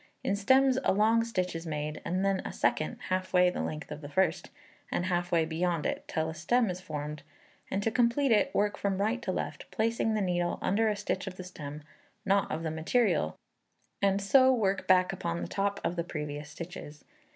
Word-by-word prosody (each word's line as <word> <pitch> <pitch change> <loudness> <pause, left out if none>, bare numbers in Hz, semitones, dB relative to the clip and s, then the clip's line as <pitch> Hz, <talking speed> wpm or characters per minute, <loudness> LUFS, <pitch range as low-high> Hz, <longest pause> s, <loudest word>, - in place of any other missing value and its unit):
In 195 - +1
stems 260 +5 +4
a - - +3
long 220 +3 +4
stitch 185 -7 -2
is 165 +1 -5
made, 150 0 -3
and 185 +3 -1
then 195 -1 +2
a - - -5
second 155 - 0
halfway 185 -1 +3
the - - -3
length 155 0 -5
of 150 0 -6
the 145 - -8
first, 180 +2 +1 0.4
and 175 - 0
half 175 -1 -1
way 165 -2 +3
beyond 165 0 -1
it, - - -2
till 160 0 -1
a 160 - -4
stem 220 +7 +1
is 180 +1 -6
formed; 150 -2 -5 0.5
and 200 +1 -1
to 225 - +1
complete 245 +3 +2
it 220 +4 +4
work 205 0 +1
from 195 -1 -1
right 220 +5 0
to 195 - -2
left, - - -4
placing 225 0 0
the - - +1
needle 175 -2 0
under 220 +3 +2
a 210 - 0
stitch 195 -2 -3
of 185 - -5
the 185 - -6
stem, 150 -4 -8 0.4
not 195 0 +2
of 160 +1 -3
the 160 - -2
material, 165 - +1 0.6
and 200 0 +2
so 260 +6 +6
work 200 -6 0
back 185 0 +4
upon 170 -3 -3
the - - -4
top 200 0 -1
of 175 - -1
the 170 - -1
previous 150 -3 -5
stitches. 155 -2 -9
185 Hz, 205 wpm, -30 LUFS, 160-205 Hz, 0.6 s, so